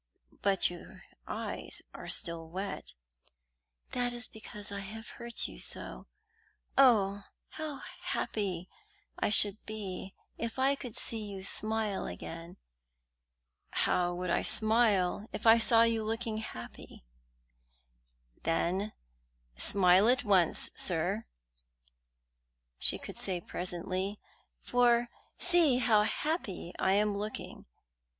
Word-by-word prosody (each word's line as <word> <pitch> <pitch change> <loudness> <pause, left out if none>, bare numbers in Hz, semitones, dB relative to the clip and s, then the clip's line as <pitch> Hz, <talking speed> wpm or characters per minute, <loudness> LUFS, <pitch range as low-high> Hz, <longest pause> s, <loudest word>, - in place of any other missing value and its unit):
"But 195 -2 +3
your 175 - -12 0.2
eyes - - -3
are - - -9
still 165 -1 +1
wet." 180 - -6 1.0
"That 245 -1 -1
is 240 -1 -2
because 210 -2 -7
I 200 - -4
have 215 +3 -8
hurt 235 0 -5
you - - -11
so. - - -4 0.7
Oh, 205 -7 +4 0.2
how 310 -3 -6 0.2
happy 185 -4 -3 0.5
I - - +1
should 205 0 +5
be 195 -3 -6 0.2
if 230 +1 -4
I 265 +1 +3
could 250 -5 -7
see 225 -2 0
you 200 -2 -7
smile 215 0 -1
again!" 165 - -8 1.1
"How 180 -1 +1
I - - -2
would 180 0 -1
smile 215 -3 +2
if - - -6
I 225 +1 +7
saw 230 0 +6
you 230 -1 +1
looking 225 0 -3
happy!" 115 - -9 1.4
"Then 185 +5 -1 0.6
smile 185 - +5
at 250 0 +2
once, 190 -6 +3
sir," - - +1 1.5
she - - +8
could - - -8
say 185 -2 -2
presently, 185 +3 -3 0.4
"for 240 -1 +3 0.3
see 345 -7 +5
how 225 -4 +4
happy 220 - -3
I 190 - +2
am 210 +1 +2
looking." 210 +1 -6
210 Hz, 115 wpm, -31 LUFS, 185-230 Hz, 1.5 s, she